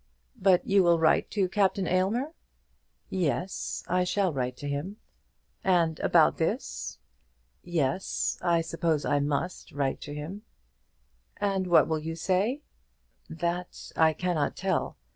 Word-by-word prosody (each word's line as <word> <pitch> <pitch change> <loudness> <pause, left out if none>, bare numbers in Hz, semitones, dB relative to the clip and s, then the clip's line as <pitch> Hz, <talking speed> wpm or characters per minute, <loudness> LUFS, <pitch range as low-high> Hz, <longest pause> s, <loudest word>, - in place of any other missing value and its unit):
"But 185 -2 +4
you 195 0 +4
will 170 -2 +4
write 160 -1 +3
to 195 -3 +1
Captain 195 0 +1
Aylmer?" 215 - 0 0.8
"Yes; 180 0 -2
I 180 0 +2
shall 185 -1 +1
write 125 -2 -2
to 145 - -6
him." 145 +9 -4 0.7
"And 170 -4 +2
about - - +4
this?" - - -2 0.7
"Yes; 165 0 -1
I 170 -1 +2
suppose 165 -2 -1
I 145 - +2
must 145 +5 -2
write 140 -1 -1
to 145 - -7
him." 165 +8 -6 1.0
"And 195 -2 0
what 175 - +5
will 160 -1 0
you 160 +1 -5
say?" 195 - 0 0.7
"That 175 +2 -4
I 160 -1 +4
cannot 165 -3 -1
tell. - - -1
175 Hz, 130 wpm, -28 LUFS, 155-190 Hz, 1.0 s, what